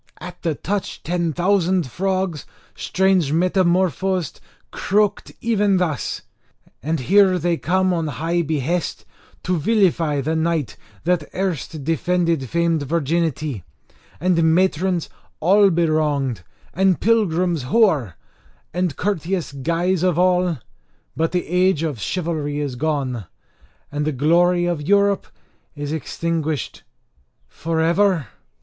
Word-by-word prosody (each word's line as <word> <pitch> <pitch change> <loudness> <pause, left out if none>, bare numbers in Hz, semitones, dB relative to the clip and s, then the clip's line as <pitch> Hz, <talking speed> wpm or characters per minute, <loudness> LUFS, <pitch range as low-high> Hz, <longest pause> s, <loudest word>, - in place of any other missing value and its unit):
At 180 0 -9
the 165 -4 -1
touch 200 +5 -4
ten 170 0 -1
thousand 180 0 +1
frogs, 185 +2 -2 0.3
strange 190 -6 +1
metamorphosed, 185 0 +1 0.3
croaked 205 +1 0
even 205 -4 +2
thus: 175 -5 -2 0.6
And 155 0 -1
here 190 +5 +4
they 175 0 0
come, 185 +2 +1
on 165 -2 -1
high 165 +4 -1
behest, 160 +2 -2 0.4
to 180 -2 0
vilify 165 -6 +2
the 155 +4 -1
knight 160 -5 -1 0.3
that 170 -3 0
erst 165 -5 -3
defended 165 -3 0
famed 170 -2 +1
virginity, 155 - -1 0.6
and 175 0 +2
matrons 185 -1 +1 0.3
all 195 +4 +5
bewronged, 155 - 0 0.3
and 190 -1 +2
pilgrims 180 -7 +1
hoar, 145 - +2 0.6
and 180 -3 -1
courteous 185 -3 -2
guise 170 +6 0
of 180 -3 +1
all! 180 -2 +2 0.6
But 165 0 0
the 180 -1 -1
age 180 -2 +2
of 145 -9 -3
chivalry 155 - -2
is 140 -4 -3
gone, 130 -6 -2 0.7
and 145 0 -2
the 155 - 0
glory 175 +5 +3
of 175 -3 -1
Europe 200 +4 +2 0.5
is 145 0 -4
extinguished 160 -1 -3 0.7
for 165 0 -3
ever?" 170 - +2
170 Hz, 115 wpm, -21 LUFS, 155-185 Hz, 0.7 s, all